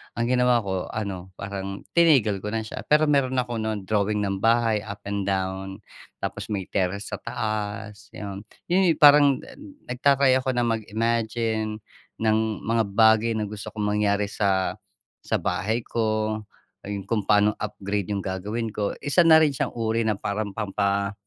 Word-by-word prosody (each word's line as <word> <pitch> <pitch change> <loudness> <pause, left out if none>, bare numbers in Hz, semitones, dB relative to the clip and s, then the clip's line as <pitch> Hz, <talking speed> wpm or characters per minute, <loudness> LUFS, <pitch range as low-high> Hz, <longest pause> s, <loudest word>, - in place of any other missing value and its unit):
ang 115 - -1
ginawa 125 -1 +3
ko 95 -2 -3
ano, 95 -4 -5
parang 100 0 -5
tinigil 135 - +4
ko - - -4
na 110 0 -2
siya. 110 - -7
Pero 150 +1 +4
meron 140 -3 +2
ako 120 -2 -2
nu'n 110 -2 -3
drawing 105 0 +1
ng 100 -1 -2
bahay 115 -1 +3
up 105 -1 -7
and 100 -1 -2
down 95 0 -2 0.4
Tapos - - -4
may 95 -3 -3
terrace 100 +2 -1
sa 105 - -4
taas 110 -1 -4
'yon. 100 -1 -6 0.2
'Yon 180 0 +4
'yong - - -3
parang 145 -2 +7 0.5
nagta-try 135 +1 +3
ako 130 0 -1
na 120 - +2
mag-imagine 110 0 -1 0.4
ng 110 -1 +3 0.3
mga 115 0 +1
bagay 110 +2 +4
na 110 - -1
gusto 105 -1 -7
kong 105 -1 -1
mangyari 100 -1 +1
sa, 95 -3 0 0.5
sa - - 0
bahay 110 +4 -1
ko. 110 -1 -1 0.5
Ayun 100 -1 -5
kung 105 0 -1
paano 105 +1 +4
upgrade 100 -1 -3
yung 100 -1 -1
gagawin 105 +5 -3
ko, 105 -1 -1
isa 145 +5 +4
na 160 -1 +8
rin 155 -3 +3
siyang 130 - -1
uri 115 0 0
na 110 -2 0
parang 105 +1 -3
pampa 100 -1 -1
110 Hz, 165 wpm, -25 LUFS, 100-115 Hz, 0.5 s, na